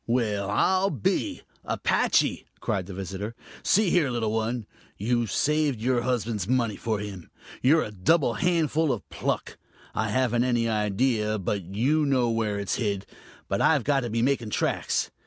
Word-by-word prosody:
"Well, 105 -5 0
I'll 185 - +2
be! 130 - -1 0.2
Apache!" - - +1
cried 95 -4 -2
the 100 - -7
visitor. 95 +4 -5 0.3
"See 205 -3 +3
here, 160 -6 +3
little 115 -3 -1
one, 110 +1 -1 0.3
you've 115 0 0
saved 150 -3 +1
your 120 +1 +1
husband's 115 -6 -1
money 120 -4 +1
for 110 +1 -2
him. 100 -4 -7 0.3
You're 155 +5 +4
a 105 - -6
double 120 - +2
handful 160 +2 +1
of 110 -7 -4
pluck. - - -3 0.3
I 110 -1 -1
haven't 120 +1 +2
any 120 -2 +1
idea 110 0 +1
but 100 +1 -2
you 145 +8 +2
know 125 -4 +2
where 110 -2 0
it's 100 -1 -2
hid 100 -4 -1 0.4
but - - -1
I've - - +4
got 140 -1 +2
to 120 -3 -3
be 115 +1 0
making 125 -4 +1
tracks. - - 0
115 Hz, 160 wpm, -26 LUFS, 105-130 Hz, 0.4 s, You're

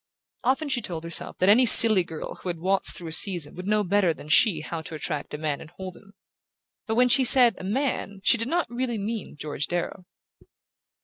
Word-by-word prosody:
Often 270 +5 -2
she 255 -3 -2
told 170 -6 -7
herself 170 0 -6
that 185 - -1
any 235 +5 +4
silly 215 -4 +9
girl 160 -2 -9
who 185 - -7
had 170 - -5
waltzed 190 +4 -1
through 170 -3 -9
a - - -10
season 170 -2 +2
would 180 +2 -10
know 210 0 0
better 185 -3 -1
than 150 - -14
she 155 - +2
how 165 +1 -7
to 160 - -10
attract 150 -1 -5
a - - -7
man 150 -2 -5
and 155 - -13
hold 185 -1 -9
him; 200 -1 -20 0.7
but 220 - -3
when 250 +1 +2
she 260 +2 +2
said 245 -2 +5
"a - - -10
man" 205 -2 -4
she - - +3
did 230 - -4
not 345 +5 -2
really 240 -1 -5
mean 210 -2 -7
George 150 -1 -5
Darrow. 175 +1 -6
195 Hz, 220 wpm, -23 LUFS, 165-230 Hz, 0.7 s, silly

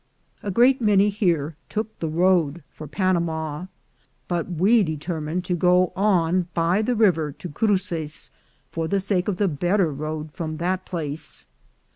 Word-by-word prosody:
A 205 - -4
great 245 +6 +4
many 205 -2 +4
here 170 -7 0
took 220 0 -4
the 165 - -2
road 170 -2 +2
for 155 - -9
Panama, 170 -2 -1 0.6
but 175 -1 -2
we 195 +7 +4
determined 160 +1 -3
to 180 - 0
go 180 +1 +3
on 180 -3 +2
by 170 +4 +2
the 245 +3 0
river 170 -9 +3
to 180 - -8
Cruces, 170 -4 -1 0.4
for 165 -1 -2
the 200 +3 +1
sake 195 -1 0
of 200 -4 -1
the 205 - +2
better 175 +2 +1
road 155 +2 -5
from 155 -1 -5
that 185 +3 -2
place. 155 -3 -4
175 Hz, 150 wpm, -24 LUFS, 160-195 Hz, 0.6 s, great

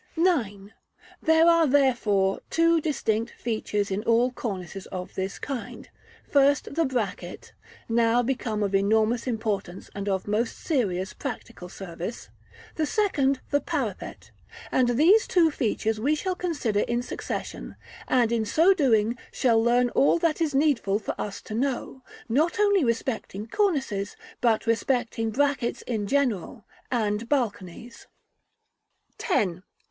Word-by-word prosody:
§ 335 -7 +3 0.2
IX. 205 - -18 0.5
There 320 +1 +4
are, 335 -2 +5
therefore, 235 -8 +2
two 330 0 +3
distinct 235 -7 -1
features 210 -3 -2
in 195 +2 -1
all 235 +2 +3
cornices 195 -6 -6
of 180 -1 -7
this 190 +1 -3
kind; 270 -5 -6 0.4
first, 280 0 +3
the 330 +2 +1
bracket, 210 -9 -4 0.3
now 235 +1 +3
become 230 -4 -2
of 200 -1 -1
enormous 220 +5 +2
importance 205 -6 -3
and 200 0 -4
of 190 -1 -1
most 220 +3 -1
serious 190 - -1
practical 180 - -7
service; 180 +4 -7 0.5
the 310 -2 +1
second, 280 -11 +1
the 285 0 +2
parapet: 260 - -4 0.4
and 245 -2 +2
these 375 +10 +5
two 335 -3 +4
features 220 -4 -1
we 285 +7 +2
shall 370 +4 -2
consider 295 - -1
in 240 +3 0
succession, - - -6 0.3
and 240 -3 +2
in 230 -2 +1
so 325 - +4
doing, 235 - +2
shall 230 -3 +2
learn 240 +1 +3
all 280 - +4
that 335 -1 0
is 300 -4 0
needful 270 -9 +2
for 215 - -4
us 205 -2 -5
to - - -8
know, 265 +2 -2 0.3
not 310 - +1
only 405 -4 +4
respecting 230 -4 -2
cornices, 265 - -1 0.3
but 230 -3 +2
respecting 230 -1 0
brackets 270 0 0
in 215 -4 -3
general, 240 -5 -1 0.2
and 220 -2 -1
balconies. 230 -4 -3 1.1
§ 375 - +2 0.2
X. - - -25
240 Hz, 135 wpm, -26 LUFS, 210-285 Hz, 1.1 s, are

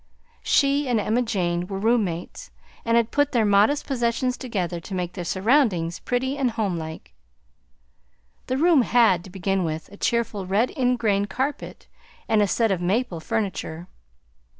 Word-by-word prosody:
She 280 0 +2
and 235 -3 +2
Emma 220 +4 +1
Jane 175 -6 -1
were 195 - -4
room 225 +3 +2
mates, 175 - -6 0.3
and 230 0 +2
had 230 -1 +1
put 290 -1 +1
their 230 -3 +3
modest 210 +9 +3
possessions 250 -1 0
together 185 -10 -3
to 190 +4 -7
make 180 -1 -3
their 180 - -5
surroundings 190 - +1
pretty 260 +3 -2
and 260 -2 +2
homelike. 165 - -4 1.3
The 255 - -1
room 325 -1 +5
had, 225 -8 +3
to - - -11
begin 195 +1 -1
with, 160 -1 -4
a 200 - -12
cheerful 225 -5 -1
red 210 +6 +1
ingrain 235 -7 +1
carpet 270 +6 -4 0.4
and 220 -1 +3
a 205 - +3
set 225 +2 +1
of 185 -2 -1
maple 190 0 -1
furniture. 185 -3 -3
215 Hz, 155 wpm, -24 LUFS, 180-245 Hz, 1.3 s, room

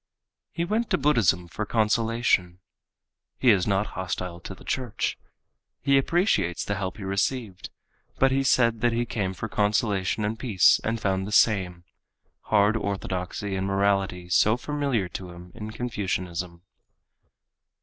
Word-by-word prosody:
He 170 - -3
went 220 +5 -1
to 185 - +2
Buddhism 100 - +2
for 105 - -4
consolation. 110 -4 +1 0.8
He 125 - +5
is 95 -4 +2
not 100 0 +1
hostile 90 -1 -4
to 95 +3 -8
the - - -16
church. 125 -4 -2 0.7
He 140 0 +4
appreciates 150 - +1
the 100 - -1
help 95 -2 -4
he 105 - -8
received, 100 +1 -2 0.5
but 135 0 +3
he 135 +1 +2
said 115 -4 +3
that 120 0 +2
he 120 +1 0
came 95 -5 -3
for 110 - -4
consolation 105 -1 0
and 110 +2 -3
peace 105 -8 +4
and 115 +1 -1
found 95 -1 -1
the - - -6
same—hard 100 +1 0
orthodoxy 95 -1 -3
and 95 0 -2
morality 95 -2 0
so 110 +5 +3
familiar 140 -7 -1
to 90 0 -7
him 90 +1 -12
in 105 0 -7
Confucianism. 90 -7 -4
100 Hz, 140 wpm, -26 LUFS, 95-115 Hz, 0.8 s, He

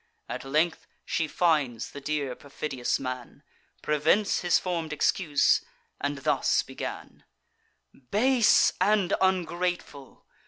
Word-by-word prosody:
At - - -5
length 155 +5 0 0.2
she 165 -2 -1
finds 145 -9 0
the 140 - -9
dear 145 -2 -2
perfidious 135 -2 -3
man; 130 -2 -6 0.4
Prevents 155 +8 +2
his 175 - +3
form'd 170 -4 -3
excuse, 150 0 +2 0.4
and 140 0 -2
thus - - +2
began: - - -8 0.9
"Base 240 +2 +4
and 200 -1 +2
ungrateful! 175 -6 -2
155 Hz, 105 wpm, -27 LUFS, 140-180 Hz, 0.9 s, Base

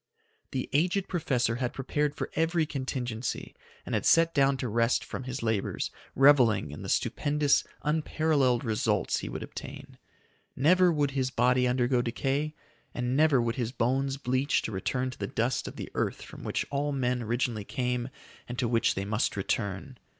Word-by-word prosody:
The 130 -2 -3
aged 180 +6 +2
professor 125 -9 0
had 125 -1 -2
prepared 145 +2 -1
for - - -4
every 165 +1 +2
contingency, 130 -5 -4 0.3
and - - -5
had - - +1
set 165 0 +4
down 135 -1 +3
to 130 - -3
rest 115 +2 +1
from 130 - -6
his 130 -1 -4
labors, 110 -3 -1 0.2
reveling 125 - +5
in 75 - -8
the - - -6
stupendous, 145 -1 +2 0.2
unparalleled 150 -4 +1
results 105 -4 0
he - - -5
would - - -5
obtain. - - -9 0.6
Never 180 +6 +5
would 145 -3 +1
his 130 -2 0
body 125 0 +3
undergo 125 0 +2
decay; 135 +6 -1 0.4
and 125 +1 -1
never 150 -2 +4
would 115 +1 -1
his 120 -2 -1
bones 135 +2 0
bleach 130 +1 +1
to - - -3
return 125 +6 -2
to - - -13
the 100 - -2
dust 120 +5 -1
of - - -7
the - - -7
earth - - -2
from - - -11
which - - -1
all 145 +1 0
men 125 -2 0
originally 115 -1 -1
came 125 +1 -2 0.4
and 120 - -5
to 125 - +1
which 115 0 +2
they 95 - -2
must 105 +1 0
return. 100 +6 -3
130 Hz, 170 wpm, -29 LUFS, 120-145 Hz, 0.6 s, reveling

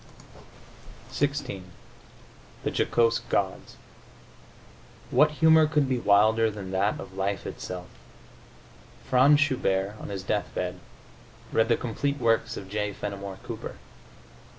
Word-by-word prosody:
XVI 145 -8 -2 1.0
THE - - -1
JOCOSE 115 -1 +2
GODS 95 -2 -1 1.4
What 150 - +5
humor 160 0 +5
could 150 -2 +1
be 130 -2 0
wilder 110 +1 +4
than 100 -3 -7
that 100 +2 0
of 95 - -9
life 100 +1 -2
itself? 90 -1 -6 1.2
Franz 135 +3 +5
Schubert, 105 -8 0
on - - -7
his 95 -2 -5
deathbed, 95 -3 -2 0.7
read 110 0 +3
the 115 - +4
complete 140 +4 -2
works 115 -2 +1
of 95 - -7
J. 105 +1 -2
Fenimore 100 -1 -6
Cooper. - - -7
110 Hz, 110 wpm, -27 LUFS, 100-130 Hz, 1.4 s, What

